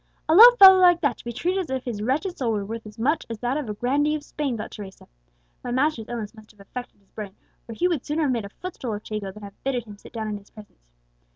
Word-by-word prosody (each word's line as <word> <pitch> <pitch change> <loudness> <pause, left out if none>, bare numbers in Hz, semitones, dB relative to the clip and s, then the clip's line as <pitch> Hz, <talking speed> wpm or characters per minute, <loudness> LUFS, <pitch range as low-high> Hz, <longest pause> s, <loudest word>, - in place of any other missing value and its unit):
"A 315 - +3
low 450 +8 +11
fellow 380 -2 +10
like 355 -2 +6
that 285 - 0
to - - -13
be 240 - -5
treated 355 - -1
as - - -18
if 260 -1 -3
his 225 -5 -4
wretched 295 - -1
soul 235 -4 -1
were 205 -2 -2
worth 225 +1 -7
as 210 +1 -13
much 290 +8 0
as 230 - -5
that 245 +4 -2
of 290 -7 -3
a 210 - -4
grandee 285 +7 +1
of 300 - -6
Spain!" 285 -4 -3
thought 215 - -6
Teresa. 195 -2 -10 0.6
"My - - -5
master's 255 -2 0
illness 230 -3 -5
must 215 -1 -16
have 210 - -22
affected 245 +3 -9
his 195 - -35
brain, 205 -3 -8 0.3
or 230 - -7
he 355 - +1
would 335 -8 -1
sooner 310 +2 -1
have 280 - +1
made 235 -3 -1
a - - -8
footstool 255 - -6
of 210 - -8
Chico 210 -3 -5
than 210 +2 -13
have 200 0 -12
bidden 260 -3 -1
him 210 -2 -12
sit - - -14
down 220 -2 -4
in 210 -1 -4
his 200 - -22
presence!" 205 - -16
240 Hz, 280 wpm, -24 LUFS, 210-295 Hz, 0.6 s, low